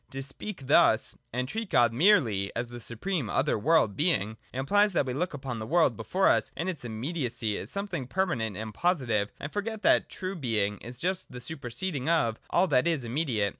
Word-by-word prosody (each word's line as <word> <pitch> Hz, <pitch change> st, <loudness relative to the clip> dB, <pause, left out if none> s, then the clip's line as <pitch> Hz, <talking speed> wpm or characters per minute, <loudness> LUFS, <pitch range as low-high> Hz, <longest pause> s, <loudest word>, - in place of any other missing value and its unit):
To 135 Hz, 0 st, -5 dB
speak 140 Hz, +3 st, -6 dB
thus, -, -, +4 dB, 0.2 s
and 125 Hz, +2 st, -2 dB
treat 220 Hz, -, -4 dB
God 120 Hz, -1 st, +4 dB
merely 120 Hz, -, +3 dB
as 120 Hz, 0 st, -2 dB
the 120 Hz, 0 st, -8 dB
supreme 120 Hz, -, -3 dB
other -, -, +1 dB
world 125 Hz, -4 st, +3 dB
Being, 110 Hz, -, +1 dB
implies 200 Hz, +11 st, +2 dB
that 145 Hz, -, +2 dB
we 130 Hz, -, -3 dB
look 170 Hz, +3 st, -2 dB
upon 130 Hz, -4 st, -5 dB
the 110 Hz, -, -5 dB
world 160 Hz, -7 st, +3 dB
before 115 Hz, -, +1 dB
us -, -, +3 dB
in 170 Hz, -, -2 dB
its 170 Hz, -8 st, -3 dB
immediacy 120 Hz, -2 st, -2 dB
as -, -, -6 dB
something 195 Hz, -10 st, -3 dB
permanent 125 Hz, -, -1 dB
and 110 Hz, 0 st, -5 dB
positive, 120 Hz, -, +1 dB
and 145 Hz, -, -6 dB
forget 215 Hz, +1 st, -3 dB
that -, -, +4 dB
true 185 Hz, 0 st, -5 dB
Being 110 Hz, -, -1 dB
is 120 Hz, +3 st, -7 dB
just 185 Hz, +4 st, -2 dB
the 125 Hz, -, -7 dB
superseding 140 Hz, +2 st, -4 dB
of 120 Hz, -10 st, +2 dB
all 180 Hz, -, +3 dB
that 130 Hz, +2 st, +3 dB
is 160 Hz, -6 st, +1 dB
immediate. 120 Hz, -5 st, 0 dB
135 Hz, 195 wpm, -28 LUFS, 115-175 Hz, 0.2 s, thus